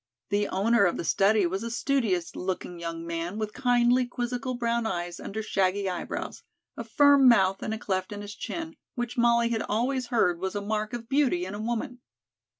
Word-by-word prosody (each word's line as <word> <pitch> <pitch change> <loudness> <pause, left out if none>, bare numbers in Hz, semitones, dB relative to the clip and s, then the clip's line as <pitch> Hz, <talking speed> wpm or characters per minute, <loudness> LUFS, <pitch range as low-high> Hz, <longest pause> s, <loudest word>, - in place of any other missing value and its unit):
The 205 0 +1
owner 205 +2 +3
of 175 - +1
the - - -3
study 200 +3 +3
was 190 +3 -2
a 230 - -4
studious 230 -8 0
looking 180 -1 -4
young 165 0 -5
man 170 +3 -4
with 215 -1 -3
kindly, 245 -1 +3
quizzical 245 +1 -3
brown 235 -1 0
eyes 175 -3 -4
under 220 +2 -5
shaggy 195 -1 0
eyebrows, 180 -1 -4 0.3
a 235 - -5
firm 280 +3 +5
mouth 195 -4 +4
and - - -3
a 220 - -2
cleft 190 -3 -2
in 205 0 -6
his 205 0 -7
chin, 325 +8 -6 0.2
which 240 -2 -3
Molly 235 -1 +3
had 225 -2 -1
always 250 +3 -1
heard 180 -8 +2
was 190 +2 -3
a - - 0
mark 215 +2 -2
of 235 -1 -5
beauty 265 -10 +2
in 190 - -6
a 205 - -5
woman. 240 +2 -3
220 Hz, 195 wpm, -27 LUFS, 190-240 Hz, 0.3 s, firm